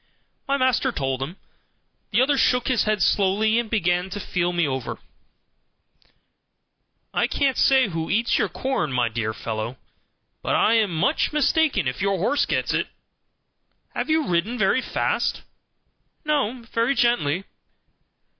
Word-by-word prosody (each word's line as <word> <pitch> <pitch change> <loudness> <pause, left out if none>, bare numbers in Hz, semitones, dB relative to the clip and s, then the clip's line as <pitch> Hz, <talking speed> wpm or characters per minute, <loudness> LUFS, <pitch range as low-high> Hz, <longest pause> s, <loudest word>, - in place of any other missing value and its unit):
My 275 +1 +1
master 260 0 +2
told 135 - -2
him. 160 +8 -5 0.7
The 230 +4 +3
other 285 +2 +2
shook 250 -2 +2
his 255 -3 +2
head 215 -2 +1
slowly, 210 +3 +2
and 235 -2 -3
began 180 -3 0
to 205 +2 -5
feel 175 -2 -1
me 175 -3 +1
over. 130 -3 -4 2.2
"I - - +2
can't 270 -2 0
say 265 -3 +4
who 165 -4 -4
eats 230 +3 +1
your - - +1
corn, 185 - -2
my 125 -2 +1
dear 110 -1 -2
fellow, 110 +2 -5 0.6
but - - 0
I 220 - +3
am 220 -3 +3
much 180 - 0
mistaken 300 - +2
if 125 +7 -3
your 195 0 +1
horse 215 +11 +1
gets - - -1
it. - - 0 1.1
Have - - -3
you 315 -1 +2
ridden 180 +8 0
very 210 +4 +2
fast?" - - -1 0.8
"No, 260 -5 0
very 230 +4 +1
gently." 235 - +1
210 Hz, 145 wpm, -23 LUFS, 170-255 Hz, 2.2 s, say